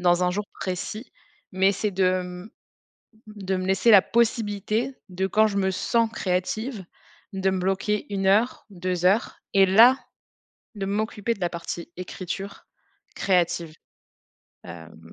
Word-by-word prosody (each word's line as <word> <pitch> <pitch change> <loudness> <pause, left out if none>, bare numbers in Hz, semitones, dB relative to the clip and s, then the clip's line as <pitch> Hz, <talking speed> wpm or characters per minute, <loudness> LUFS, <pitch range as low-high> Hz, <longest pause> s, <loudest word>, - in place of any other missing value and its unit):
dans 175 0 +3
un 180 - +2
jour 205 +3 -2 0.2
précis, 190 +5 -5 0.4
mais 190 +1 +3
c'est 205 +2 -2
de 185 -1 +1
mmh, 180 +3 -9 0.9
de 190 0 0
me 185 - -3
laisser 195 +5 +3
la 200 -4 +8
possibilité 225 +1 0
de 190 +1 -2
quand 215 +3 +3
je 200 - -4
me 190 -1 +1
sens 230 +4 +1
créative, 200 +4 -2 0.5
de 190 0 0
me 190 - -1
bloquer 195 +3 -1
1 195 -1 -1
heure, 215 +6 +2
2 180 -2 -3
heures 205 +5 +1
et 195 -1 +6
là 230 +7 +7 0.8
de 200 -2 -3
m'occuper 215 +2 -1
de 195 - -18
la 175 - +1
partie 170 0 -6
écriture 185 +2 -6 0.5
créative. 170 -4 0 0.9
Hem 85 -1 -12
190 Hz, 145 wpm, -25 LUFS, 180-210 Hz, 0.9 s, la